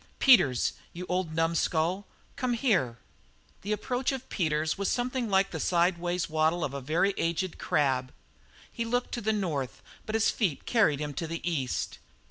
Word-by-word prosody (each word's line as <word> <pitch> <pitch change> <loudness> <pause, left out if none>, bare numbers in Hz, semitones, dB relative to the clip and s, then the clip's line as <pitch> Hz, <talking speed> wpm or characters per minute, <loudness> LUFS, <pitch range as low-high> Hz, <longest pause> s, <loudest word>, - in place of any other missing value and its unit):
"Peters, 180 - +5 0.2
you 180 +2 -6
old 180 -3 -1
numskull, 165 +3 +1 0.3
come 255 -3 -1
here!" 190 - +1 0.6
The 205 - -4
approach 245 +5 -1
of 260 -1 -6
Peters 155 -3 0
was 200 0 -1
something 245 -1 -1
like 195 0 +3
the 160 - -4
sidewise 175 +1 +1
waddle 160 +2 +1
of 135 - -2
a 140 - -4
very 165 +9 +1
aged 170 +2 -1
crab. 130 -3 +1 0.6
He 230 - -3
looked 245 +2 -1
to 240 - -3
the 220 - +1
north, 160 - -2 0.2
but 215 - -2
his 225 - +3
feet 185 - -1
carried 200 - +3
him 150 -1 -3
to 165 +4 -3
the 165 +1 -4
east. 140 -7 -2
175 Hz, 165 wpm, -29 LUFS, 155-215 Hz, 0.6 s, Peters